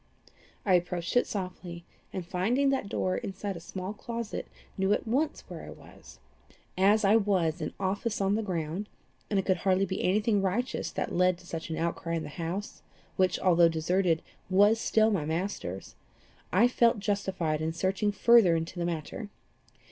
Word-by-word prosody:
I 195 - +3
approached 175 +1 0
it 245 - +4
softly, 180 -3 -6 0.3
and 185 -2 -5
finding 235 +11 +1
that 265 -7 -1
door 185 -2 0
inside 195 0 -4
a - - -6
small 185 +3 -6
closet, 230 +1 -5 0.3
knew 190 +1 +2
at - - -1
once 280 +7 0
where - - -8
I - - -9
was. - - -14 0.6
As 205 +3 +4
I 205 +3 +6
was 185 -7 +1
in 155 - -3
office 200 +3 -1
on 195 0 +2
the 220 - +1
ground, 180 0 -3 0.4
and 205 - +1
it 190 - +1
could 185 -2 +2
hardly 190 +2 +2
be 190 - -3
any 190 +3 +3
thing 210 -2 +1
righteous 205 +7 -1
that - - -3
led 180 0 +3
to 180 - -17
such 165 -1 -6
an 160 - -3
outcry 170 0 -2
in 165 - -2
the 150 - -6
house, 175 +6 -5 0.3
which, 185 -1 +2
although 175 -2 +5
deserted, 165 +1 +1 0.3
was 205 +4 +5
still 220 0 +3
my 190 -7 0
master's, 160 - -4 0.6
I 210 +7 +5
felt 235 -2 +3
justified 190 -6 -1
in 160 +1 -1
searching 190 +5 0
further 210 -4 +5
into 165 +2 -3
the 170 - 0
matter. 170 +5 -4
190 Hz, 180 wpm, -29 LUFS, 170-205 Hz, 0.6 s, I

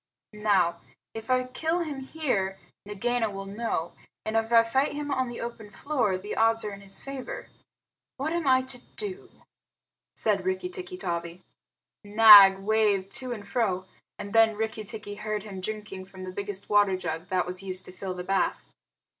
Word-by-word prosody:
"Now, 190 -5 +2 0.3
if 225 +1 -8
I 255 0 +3
kill 320 +7 -1
him 300 -5 -4
here, 255 -10 -2 0.3
Nagaina 225 +3 0
will 195 -1 -6
know; 200 -5 -3 0.3
and 220 - -2
if 225 +1 +1
I 230 -1 +7
fight 265 +6 +1
him 290 0 -4
on 260 -2 0
the 240 - -7
open 230 -3 -6
floor, 220 -3 -1
the 205 +3 -6
odds 225 0 +3
are 210 - -4
in 200 - -10
his 195 0 -7
favor. 275 - -7 0.7
What 290 +4 -2
am 340 -4 -1
I 260 0 +5
to 260 -1 -8 0.2
do?" 400 -2 -5 0.9
said 205 -4 0
Rikki 185 0 -1
tikki 180 0 -7
tavi. 170 -1 -4 0.6
Nag 205 -2 +9
waved 200 -1 +1
to 255 -1 -6
and 210 -4 -6
fro, 200 -8 0 0.3
and 200 - -7
then 225 -1 +5
Rikki 220 0 -3
tikki 210 0 -5
heard 210 0 -4
him 195 -3 -7
drinking 210 -2 -6
from 190 -1 -11
the 185 - -6
biggest 200 +1 -5
water 205 -2 +4
jar 165 -3 -3
that 180 +2 -1
was 180 +1 -4
used 185 -1 -2
to - - -9
fill 185 0 -5
the 180 - -5
bath. 195 +1 0
210 Hz, 180 wpm, -27 LUFS, 190-240 Hz, 0.9 s, Nag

